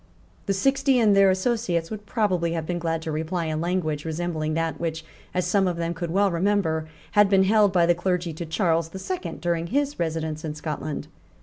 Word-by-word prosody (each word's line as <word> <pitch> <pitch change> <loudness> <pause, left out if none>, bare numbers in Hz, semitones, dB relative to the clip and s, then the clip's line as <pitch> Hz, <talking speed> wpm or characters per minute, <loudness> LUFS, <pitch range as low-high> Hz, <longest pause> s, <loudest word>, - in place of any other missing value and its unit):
The 200 - +2
Sixty 270 +5 +2
and 215 -4 +4
their 195 -1 +6
associates 185 -4 0
would 210 -1 -7
probably 180 -7 0
have 165 -2 -2
been 175 +1 -2
glad 165 -1 -2
to 160 - -3
reply 160 +3 -2
in 155 0 -2
language 165 -4 -1
resembling 160 -1 -2
that 165 0 -1
which, 160 -1 -3 0.3
as 180 -1 -1
some 190 +2 +2
of 175 -2 -1
them 170 0 -1
could 170 0 -4
well 195 +3 +2
remember, 170 -3 +1 0.2
had 205 -1 +5
been 195 -1 +5
held 205 0 +4
by 175 -3 +4
the 175 - +4
clergy 175 -1 -1
to 170 +2 -5
Charles 165 0 +1
the 190 - -8
Second 365 - -5
during 170 -1 -1
his 285 +4 -1
residence 160 -2 -2
in 155 -2 -4
Scotland. 155 -1 -4
175 Hz, 205 wpm, -25 LUFS, 160-195 Hz, 0.3 s, their